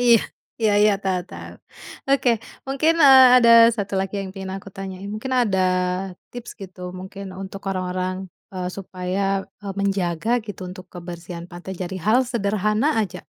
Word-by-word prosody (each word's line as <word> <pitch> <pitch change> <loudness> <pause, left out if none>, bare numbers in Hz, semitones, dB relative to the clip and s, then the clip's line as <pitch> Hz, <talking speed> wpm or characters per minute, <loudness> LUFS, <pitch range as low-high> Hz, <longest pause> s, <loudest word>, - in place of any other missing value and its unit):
Iya 240 -1 +6 0.4
iya 220 -2 +3
iya, 210 0 +5
tau 185 -2 0
tau. - - -9 0.6
Oke, 275 -2 +3 0.4
mungkin, 275 +4 +2
eee, 260 -2 +9
ada 235 -2 +6 0.3
1 205 -2 -3
lagi 195 +1 -4
yang 195 -1 -5
pengen 190 -1 -6
aku 195 - -10
tanyain. 195 0 -6
Mungkin 260 +5 -5
ada 200 -5 0 0.7
tips 245 -1 -8
gitu 185 -1 -10 0.2
mungkin, 195 +2 -8 0.2
untuk 195 +1 -8
orang-orang, 185 0 -2 0.4
eee, 180 -1 -3
supaya, 185 0 -4 0.4
e - - -9
menjaga 195 0 -1 0.2
gitu 205 -3 -8
untuk 185 0 -10
kebersihan 170 -1 -8
pantai 175 +2 -8
jadi 185 +1 -5
hal 220 +4 +4
sederhana 215 +2 +1
aja. 205 -5 -4
195 Hz, 155 wpm, -22 LUFS, 185-215 Hz, 0.7 s, eee